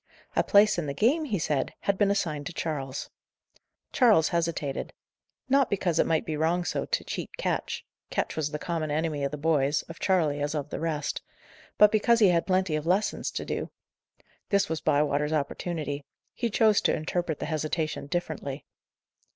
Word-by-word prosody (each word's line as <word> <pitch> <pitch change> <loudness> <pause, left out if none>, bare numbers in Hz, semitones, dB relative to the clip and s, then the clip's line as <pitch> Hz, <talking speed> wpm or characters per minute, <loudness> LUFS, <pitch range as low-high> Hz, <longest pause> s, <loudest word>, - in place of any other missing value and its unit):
A - - +4
place 205 -2 +5
in 160 - -3
the 140 - -3
game, 285 - +2
he 220 -8 -1
said, 150 -4 -1
had 200 - +1
been 200 0 +2
assigned 155 -8 -1
to 180 - -6
Charles. 140 -5 -4 0.8
Charles 220 - +5
hesitated. 165 -5 -2 0.5
Not 270 -1 +3
because 180 -4 0
it - - +3
might 160 -1 +1
be 155 - -2
wrong 165 +3 +1
so - - -1
to - - -1
cheat - - -5
Ketch - - -2 0.2
Ketch - - -2
was 155 -2 -1
the 150 - -3
common 165 -2 -3
enemy 150 -1 -1
of 140 - +1
the 150 - -5
boys, 150 -1 +1
of 165 - -11
Charley 160 -7 +1
as 145 +2 -1
of 150 -1 -3
the - - -3
rest 150 -3 -2 0.6
but 210 0 +7
because 225 +2 +4
he 210 -4 +6
had 170 -1 +2
plenty 185 -4 +2
of 155 +1 -3
lessons 195 +5 +1
to - - -4
do. - - -3 0.8
This 200 -4 +2
was 160 -1 -2
Bywater's 150 0 +1
opportunity; 145 -1 -2 0.3
he 235 - -1
chose 215 0 +4
to - - +2
interpret 165 0 -2
the - - -4
hesitation 155 -1 -2
differently. 145 -4 -4
160 Hz, 180 wpm, -27 LUFS, 150-190 Hz, 0.8 s, but